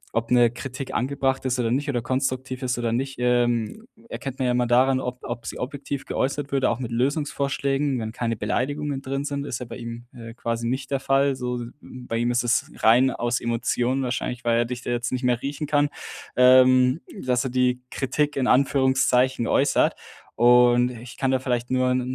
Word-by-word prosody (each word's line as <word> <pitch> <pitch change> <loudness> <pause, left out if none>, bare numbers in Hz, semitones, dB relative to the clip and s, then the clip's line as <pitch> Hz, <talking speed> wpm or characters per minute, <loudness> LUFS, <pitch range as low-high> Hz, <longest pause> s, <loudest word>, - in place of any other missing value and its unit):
ob 115 0 -1
'ne 120 -2 +4
Kritik 130 +2 -7
angebracht 135 +1 -1
ist 130 -1 0
oder 115 -1 0
nicht 140 +3 -1
oder 125 -4 0
konstruktiv 130 0 -2
ist 125 -1 -1
oder 120 -1 -1
nicht, 135 +3 -2
ähm, 120 - 0 0.2
erkennt 135 -1 -6
man 130 - 0
ja - - +2
immer 125 0 +1
daran, 130 +2 +3
ob 125 -1 -5
ob 120 -1 -6
sie - - -5
objektiv 140 +1 -5
geäußert 140 +1 -2
würde, 135 -2 +2
auch 115 - -2
mit 125 -3 -5
Lösungsvorschlägen, 140 +1 0
wenn 110 0 -4
keine 115 0 -2
Beleidigungen 145 +5 -2
drin 135 +1 -3
sind 140 -1 -3
ist 125 - -4
ja 125 - -6
bei - - -8
ihm, 115 0 -7
äh, 115 -1 -10
quasi 115 -1 -3
nicht 130 +2 -3
der 135 - +1
Fall, 135 0 +2
so 125 -1 -3 0.2
m 125 -1 -11
bei 115 - -2
ihm 120 +1 0
ist 120 0 +1
es 120 -1 +1
rein 125 +4 +6
aus 120 0 -1
Emotionen 120 +2 0
wahrscheinlich, 125 -1 -3
weil 115 0 +3
er 120 - +2
dich 125 +1 -5
da - - -3
jetzt 120 0 -2
nicht 130 0 -2
mehr 125 -1 +1
riechen 145 +2 -4
kann. 145 0 +2 0.5
Ähm, 130 +2 +6 0.3
dass 125 -1 +1
er 130 - -1
die 125 0 +1
"Kritik" 145 +2 -1
in 130 -2 0
Anführungszeichen 130 -2 +2
äußert. 140 +1 +2 0.4
Und 120 +1 +5
ich 120 0 -10
kann 135 - 0
dir 130 - +2
vielleicht 125 -2 -2
nur 130 0 +2
'n 125 0 +1
125 Hz, 205 wpm, -24 LUFS, 120-135 Hz, 0.5 s, rein